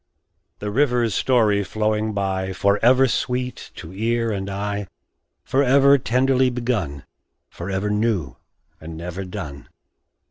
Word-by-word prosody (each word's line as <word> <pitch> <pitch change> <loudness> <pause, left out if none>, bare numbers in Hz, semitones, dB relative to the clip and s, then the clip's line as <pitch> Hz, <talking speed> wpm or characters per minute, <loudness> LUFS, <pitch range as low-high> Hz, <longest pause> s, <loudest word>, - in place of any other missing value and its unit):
The 105 0 -4
river's 120 -3 +2
story 110 -4 +2
flowing 110 +2 -1
by, 95 -2 -2
Forever 115 +8 +4
sweet 125 +1 -2
to 90 0 -9
ear 115 +3 0
and 100 -1 -3
eye, 100 0 -3 0.6
Forever 140 +1 +4
tenderly 130 +2 +2
begun 115 - -2 0.5
Forever 95 +3 -3
new 105 - 0 0.4
and 80 0 -9
never 90 +3 -5
done. 85 -7 -8
105 Hz, 110 wpm, -22 LUFS, 95-125 Hz, 0.6 s, Forever